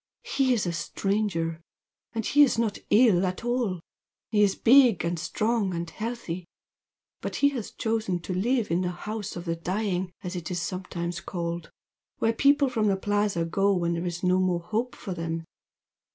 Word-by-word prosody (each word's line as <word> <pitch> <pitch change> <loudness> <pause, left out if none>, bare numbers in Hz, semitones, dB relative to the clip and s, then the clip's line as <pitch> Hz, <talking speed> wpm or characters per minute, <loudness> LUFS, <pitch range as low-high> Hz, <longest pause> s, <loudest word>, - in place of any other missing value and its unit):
"He 270 -2 +1
is 230 -6 +2
a 175 - -1
stranger 170 0 -1 0.5
and 225 -2 -2
he's 290 -4 +5
not 225 -3 0
ill 210 -5 +5
at 185 +5 -2
all. 240 -7 0 0.5
He 210 -2 +3
is 200 -2 +4
big 240 - +5
and 170 0 -1
strong 210 +1 0
and 170 0 -3
healthy. 185 -4 -5 0.7
But - - -4
he 285 - +4
has 250 -7 -5
chosen 220 -5 -1
to 185 - -4
live 225 +3 +1
in 170 +2 +2
the 180 - 0
'house 205 +3 -5
of 175 0 -6
the 165 -1 -1
dying,' 185 +1 -2
as 180 0 -4
it 170 -3 -4
is 180 -1 -2
sometimes 175 -1 -4
called 170 -2 -4 0.5
where 225 - +2
people 280 +3 +4
from 225 -4 +1
the 195 -1 +2
Plaza 205 -3 0
go 195 +4 +2
when 170 -1 0
there's 170 +1 -3
no 180 0 +3
more 180 -2 +1
hope 225 +7 -2
for 195 - -5
them. 165 -1 -4
190 Hz, 175 wpm, -27 LUFS, 175-225 Hz, 0.7 s, he's